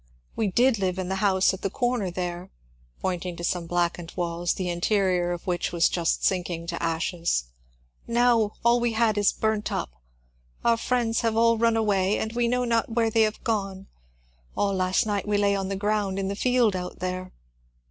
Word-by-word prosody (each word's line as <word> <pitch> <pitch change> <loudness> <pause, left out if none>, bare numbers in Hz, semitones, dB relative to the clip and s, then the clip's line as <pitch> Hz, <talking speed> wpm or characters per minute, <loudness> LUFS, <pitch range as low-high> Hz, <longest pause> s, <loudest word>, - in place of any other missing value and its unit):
" - - -37
We 220 - 0
did 235 +4 +3
live 185 -1 -1
in 185 -1 -3
the 190 - -1
house 190 -2 +3
at 190 - -7
the 195 - -1
comer 240 -2 -1
there," 175 0 -4 0.5
pointing 180 -1 -2
to 170 - -8
some 175 -1 -1
blackened 175 -1 -1
walls, 175 0 -1
the 185 - -3
interior 180 0 +1
of 175 -1 -5
which 175 -2 -1
was 170 -1 +3
just 170 -2 0
sinking 175 -3 -1
to 170 - -4
ashes; 165 - 0
'^ - - -28 0.6
now 235 -3 +3
all 240 +1 +5
we 240 -1 0
had 220 -1 +2
is 205 - +4
burnt 220 -1 -1
up. - - -3 0.7
Our 235 -1 +4
friends 230 -1 0
have 225 -1 0
all 230 0 +4
run 230 0 +3
away, 200 -2 +1
and 220 - -3
we 240 0 +1
know 250 +1 +1
not 230 -1 +1
where 225 -1 +1
they 225 - +3
have 215 -1 0
gone. 195 -4 -2 0.7
All 200 -1 +1
last 185 +1 +1
night 205 -1 -2
we 205 0 +1
lay 200 0 +2
on 195 -1 -2
the 195 - -2
ground 205 -1 -1
in 195 -1 -2
the 200 - -3
field 245 -2 +2
out 180 0 -5
there." 185 +1 -4
195 Hz, 200 wpm, -25 LUFS, 180-225 Hz, 0.7 s, all